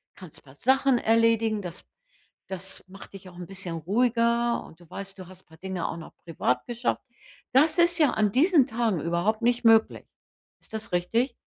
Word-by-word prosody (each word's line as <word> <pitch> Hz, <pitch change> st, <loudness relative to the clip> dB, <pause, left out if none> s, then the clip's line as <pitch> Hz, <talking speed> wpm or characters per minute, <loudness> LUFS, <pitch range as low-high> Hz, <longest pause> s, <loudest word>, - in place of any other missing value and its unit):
kannst 180 Hz, -6 st, -12 dB
du -, -, -26 dB
paar 135 Hz, 0 st, -17 dB
Sachen 265 Hz, -, +3 dB
erledigen, 225 Hz, -1 st, +2 dB
das 175 Hz, 0 st, -8 dB, 0.6 s
das 190 Hz, 0 st, -5 dB
macht 195 Hz, +1 st, -13 dB
dich 190 Hz, -1 st, -11 dB
auch 175 Hz, -, -16 dB
'n 180 Hz, -, -7 dB
bisschen 190 Hz, -3 st, -6 dB
ruhiger 235 Hz, +6 st, +1 dB
und 160 Hz, -, -16 dB
du 175 Hz, -, -19 dB
weißt, 195 Hz, 0 st, -8 dB
du 185 Hz, -, -9 dB
hast 185 Hz, 0 st, -14 dB
'n -, -, -42 dB
paar 160 Hz, -, -18 dB
Dinge 185 Hz, 0 st, -4 dB
auch 165 Hz, -, -5 dB
noch 165 Hz, -, -11 dB
privat 125 Hz, -7 st, -2 dB
geschafft. 240 Hz, 0 st, -2 dB, 0.5 s
Das 300 Hz, +6 st, +4 dB
ist 340 Hz, 0 st, +4 dB
ja 300 Hz, -, +4 dB
an 210 Hz, -2 st, +1 dB
diesen 300 Hz, -, +4 dB
Tagen 225 Hz, -6 st, -1 dB
überhaupt 175 Hz, +7 st, -1 dB
nicht 245 Hz, +1 st, +1 dB
möglich. 225 Hz, -1 st, +4 dB, 0.5 s
Ist -, -, -18 dB
das 220 Hz, +1 st, -5 dB
richtig? 230 Hz, +9 st, 0 dB
215 Hz, 195 wpm, -26 LUFS, 180-240 Hz, 0.6 s, Das